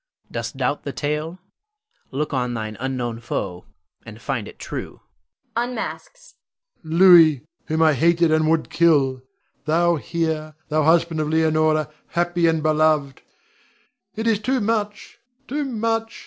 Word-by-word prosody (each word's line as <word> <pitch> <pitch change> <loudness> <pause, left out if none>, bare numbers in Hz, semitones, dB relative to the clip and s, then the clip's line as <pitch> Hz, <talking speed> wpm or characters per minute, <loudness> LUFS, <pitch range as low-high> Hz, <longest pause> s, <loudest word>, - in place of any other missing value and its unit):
Dost - - -5
doubt - - -1
the - - -5
tale? 150 +4 -3 0.7
Look 145 +3 -3
on 125 -2 -1
thine 110 -1 -5
unknown 125 -3 -3
foe, 90 -6 -4 0.4
and - - -11
find - - -3
it - - -12
true - - -7 0.5
[unmasks]. 250 - -5 0.5
Rod. 160 - -10
Louis, 165 -6 +7 0.2
whom 160 +1 +1
I 155 -1 +5
hated, 170 +3 +3
and 155 0 +2
would 160 0 0
kill, 140 -6 +3 0.4
thou 170 +2 +2
here, 160 -1 -3
thou 155 0 +2
husband 165 +1 +2
of 150 -1 -1
Leonore, 155 -1 +2 0.2
happy 175 0 +1
and 160 -1 +1
beloved! 155 -3 +1 0.9
It 220 - -4
is 225 -3 +2
too 255 +4 0
much, 210 -1 -3 0.3
too 295 +3 -2
much! 225 -2 -2
160 Hz, 135 wpm, -22 LUFS, 150-175 Hz, 0.9 s, Louis